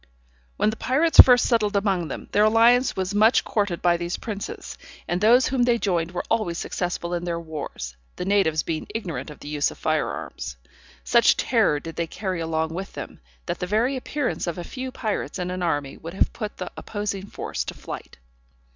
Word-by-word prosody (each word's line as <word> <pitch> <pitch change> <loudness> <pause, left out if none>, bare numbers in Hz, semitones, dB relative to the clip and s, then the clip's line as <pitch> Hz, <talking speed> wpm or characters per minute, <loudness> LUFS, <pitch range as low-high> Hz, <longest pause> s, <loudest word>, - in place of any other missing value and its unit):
When 215 - +2
the 220 - -7
pirates 305 +8 +1
first 250 -1 +10
settled 215 -4 +2
among 195 -4 +1
them, - - -6
their 210 +1 +4
alliance 235 +3 +5
was 190 +1 -2
much 215 +3 +5
courted 200 -5 -1
by 175 -1 +4
these 175 +1 -3
princes, 205 -3 -6 0.3
and 175 +1 -1
those 240 +4 +6
whom 260 -1 0
they 240 -1 +4
joined 175 -6 0
were 180 - -3
always 175 -6 0
successful 175 -1 -3
in 175 0 -2
their 170 -1 -2
wars, 150 - -6 0.2
the 180 - -4
natives 190 -6 +2
being 160 -2 -3
ignorant 185 -8 -4
of 150 - -12
the - - -9
use 150 -1 +1
of - - -11
fire - - 0
arms. 70 - -6 0.5
Such 60 - +4
terror 150 - +2
did 165 +2 -9
they 170 - -1
carry 185 0 -3
along 160 -1 -1
with 190 +3 -5
them, - - -8 0.3
that - - -3
the 180 - -2
very 225 +7 +1
appearance 265 -4 -2
of 170 - -2
a 175 - -4
few 260 +6 -6
pirates 215 -6 -3
in 180 -1 -3
an 180 0 -4
army 145 -5 -1
would 165 +3 -8
have - - +1
put 215 -3 -5
the - - -5
opposing 205 -2 -4
force - - -4
to - - -6
flight. - - -8
190 Hz, 200 wpm, -24 LUFS, 170-220 Hz, 0.5 s, first